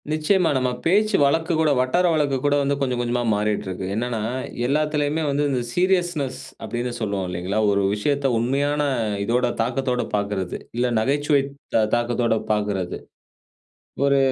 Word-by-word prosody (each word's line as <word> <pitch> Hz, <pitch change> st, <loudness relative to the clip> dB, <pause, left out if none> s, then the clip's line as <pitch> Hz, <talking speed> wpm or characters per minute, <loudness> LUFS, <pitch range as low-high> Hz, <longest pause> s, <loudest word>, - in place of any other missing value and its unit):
நிச்சியமா. 165 Hz, +3 st, +2 dB
நம்ம 130 Hz, -1 st, +1 dB, 0.2 s
பேச்சு 210 Hz, +5 st, +3 dB
வழக்கு 160 Hz, +5 st, +2 dB
கூட, 155 Hz, -2 st, +3 dB
வட்டார 130 Hz, +8 st, +2 dB
வழக்கு 145 Hz, -3 st, +1 dB
கூட 145 Hz, 0 st, +3 dB
வந்து 140 Hz, 0 st, +1 dB
கொஞ்சம் 125 Hz, -3 st, 0 dB
கொஞ்சமா 120 Hz, 0 st, 0 dB
மாறிட்டுருக்கு. 105 Hz, -3 st, -2 dB
என்னன்னா, 120 Hz, 0 st, -2 dB, 0.5 s
எல்லாத்திலயுமே 150 Hz, +2 st, 0 dB
வந்து 145 Hz, +1 st, +1 dB
இந்த 130 Hz, -2 st, 0 dB
சீரியஸ்னெஸ் 175 Hz, -8 st, 0 dB, 0.2 s
அப்டின்னு 120 Hz, +3 st, -3 dB
சொல்லுவோம் 100 Hz, -4 st, -2 dB
இல்லைங்களா? 90 Hz, +4 st, -2 dB
ஒரு 100 Hz, 0 st, +2 dB
விஷயத்த 140 Hz, +6 st, 0 dB
உண்மையான 140 Hz, +5 st, 0 dB, 0.4 s
இதோட 120 Hz, +4 st, +1 dB
தாக்கத்தோட 125 Hz, +1 st, 0 dB
பார்க்குறது. 100 Hz, -3 st, -2 dB, 0.2 s
இல்ல 125 Hz, +1 st, +2 dB
நகைச்சுவை 145 Hz, +4 st, +2 dB, 0.3 s
தா 115 Hz, -, +5 dB
தாக்கத்தோட 120 Hz, -1 st, +1 dB
பார்க்குறது. 105 Hz, -4 st, -1 dB, 1.1 s
ஒரு 140 Hz, 0 st, +4 dB
130 Hz, 135 wpm, -23 LUFS, 110-145 Hz, 1.1 s, தா